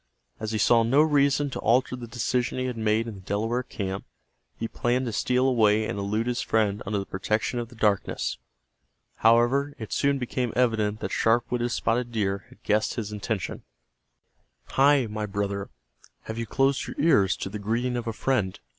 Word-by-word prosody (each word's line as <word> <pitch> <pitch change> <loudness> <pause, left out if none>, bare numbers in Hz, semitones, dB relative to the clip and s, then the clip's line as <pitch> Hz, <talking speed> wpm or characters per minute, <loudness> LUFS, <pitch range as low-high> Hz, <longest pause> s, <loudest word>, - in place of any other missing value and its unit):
As 110 -1 -3
he 110 - 0
saw 115 +2 +4
no 130 +6 +4
reason 145 -1 +2
to - - -4
alter 125 +3 +2
the 120 -2 -8
decision 120 +2 -1
he 130 - -1
had 125 -2 -3
made 110 0 +1
in 115 - -5
the 95 - -11
Delaware 110 +6 -1
camp, 95 -5 -5 0.5
he 115 - -3
planned 125 +3 0
to 115 - -3
steal 125 +3 +2
away 110 -4 +3
and 100 - -3
elude 105 +3 -1
his 125 0 -1
friend 105 -2 +1
under 105 +1 0
the 100 - -2
protection 110 +5 -1
of 120 -1 -5
the 120 - -15
darkness. 105 -3 0 0.8
However, 120 +5 +3
it 110 -4 -6
soon 140 0 +2
became 125 -2 -2
evident 110 -4 +1
that - - -3
sharp 120 +2 +2
witted 120 0 0
Spotted 120 0 0
Deer 100 -3 -1
had - - -20
guessed 105 +1 +1
his 105 -3 -4
intention. 105 -2 -3 1.1
"Hi, 140 -1 +4
my 105 -1 -4
brother, 100 0 -3 0.5
have 110 +1 -6
you 115 - -3
closed 135 +2 +1
your - - -7
ears 105 - +4
to - - -4
the 105 +2 -6
greeting 120 +4 -1
of 120 -1 -3
a - - 0
friend?" 110 -6 -1
115 Hz, 190 wpm, -26 LUFS, 105-125 Hz, 1.1 s, saw